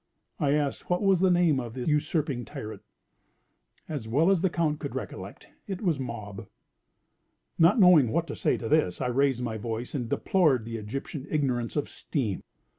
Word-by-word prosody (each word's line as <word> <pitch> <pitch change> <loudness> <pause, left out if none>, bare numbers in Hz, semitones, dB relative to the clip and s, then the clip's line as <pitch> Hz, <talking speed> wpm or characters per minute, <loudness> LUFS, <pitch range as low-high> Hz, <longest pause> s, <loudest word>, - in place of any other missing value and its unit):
I 140 -1 +2
asked 145 -2 -1
what 180 +2 +1
was 195 -3 +4
the 190 +1 +4
name 175 -6 +3
of 120 -2 -6
the 125 - -4
usurping 150 -4 0
tyrant. 125 -7 -8 1.1
As 145 -8 -5
well 150 +11 +3
as 190 -4 +2
the 190 - +2
Count 160 -3 0
could - - -5
recollect, - - -7 0.2
it 190 -3 -4
was 165 -7 +1
Mob. 110 -6 -6 1.1
Not 175 +8 +5
knowing 175 - +7
what 165 +6 0
to - - -6
say - - +1
to 115 - -5
this, 150 - +2
I - - -1
raised 125 0 +1
my 110 -2 -3
voice, 115 +2 -4
and 125 -6 -3
deplored 150 - +2
the 115 0 -4
Egyptian 130 +6 -6
ignorance 125 -6 -1
of 145 - 0
steam. 115 - -3
140 Hz, 180 wpm, -27 LUFS, 120-165 Hz, 1.1 s, knowing